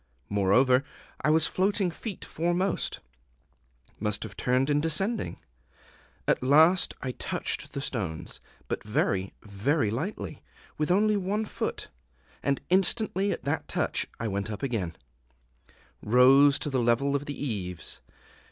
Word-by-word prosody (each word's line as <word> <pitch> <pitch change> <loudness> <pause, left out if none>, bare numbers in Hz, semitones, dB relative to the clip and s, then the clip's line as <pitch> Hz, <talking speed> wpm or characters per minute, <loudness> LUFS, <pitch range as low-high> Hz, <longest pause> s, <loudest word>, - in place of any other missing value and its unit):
Moreover, 125 +7 +4 0.4
I - - +2
was 160 0 +4
floating 190 0 +1
feet 200 +3 -7
foremost 175 +3 -1 1.0
must 105 -1 -1
have 105 -3 -8
turned 130 +5 +1
in 145 0 +3
descending. 190 +8 -1 0.9
At - - +2
last 160 +7 +5
I 130 - -2
touched - - -3
the 140 - -3
stones 95 - -4 0.3
but - - -3
very, 100 -2 0
very 105 +4 0
lightly, 155 - -4 0.3
with 150 - -1
only 210 +3 +3
one 200 +3 -1
foot; - - -4 0.5
and 140 -1 0
instantly 195 +1 +2
at - - -4
that 145 +3 -2
touch - - -1
I 115 - -2
went 100 0 -2
up 105 +3 -6
again, 105 -11 -2 1.1
rose 135 +5 +6
to 145 - -3
the 130 -2 +1
level 120 +4 +2
of 140 +1 -2
the 145 - -5
eaves. 90 - -4
140 Hz, 135 wpm, -28 LUFS, 110-175 Hz, 1.1 s, rose